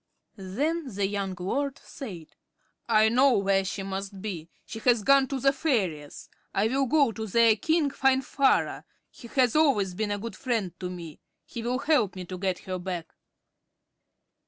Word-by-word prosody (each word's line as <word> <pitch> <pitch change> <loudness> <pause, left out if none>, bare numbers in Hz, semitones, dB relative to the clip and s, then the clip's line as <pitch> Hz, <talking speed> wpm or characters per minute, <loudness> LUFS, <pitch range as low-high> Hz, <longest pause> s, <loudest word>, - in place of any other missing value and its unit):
Then 275 - -2
the 200 0 +1
young 195 -1 -2
lord 275 +9 -2
said: 180 - -9 0.5
"I 215 -1 +5
know 255 +1 +4
where 195 -1 +2
she 195 +1 -4
must 195 0 -5
be. 180 -5 -6 0.2
She 225 - -7
has 235 -2 +3
gone 275 +1 +5
to 270 0 -3
the 275 +2 +3
fairies. 195 - -2 0.3
I 195 - +2
will 270 +2 +1
go 280 -2 +3
to 220 0 -5
their 230 +2 +5
king, 315 +4 +1
Finvarra. 270 0 +2 0.3
He 235 - -12
has 250 0 +2
always 250 - +3
been 215 +3 -2
a 205 - -1
good 215 0 -6
friend 225 -7 -2
to 180 - -4
me. 170 -4 -8 0.3
He 235 - -7
will 245 +2 -1
help 255 - +1
me 185 -1 -6
to 185 +1 -7
get 185 -1 -1
her 185 -1 -3
back." 175 -2 -5
215 Hz, 170 wpm, -27 LUFS, 190-265 Hz, 0.5 s, I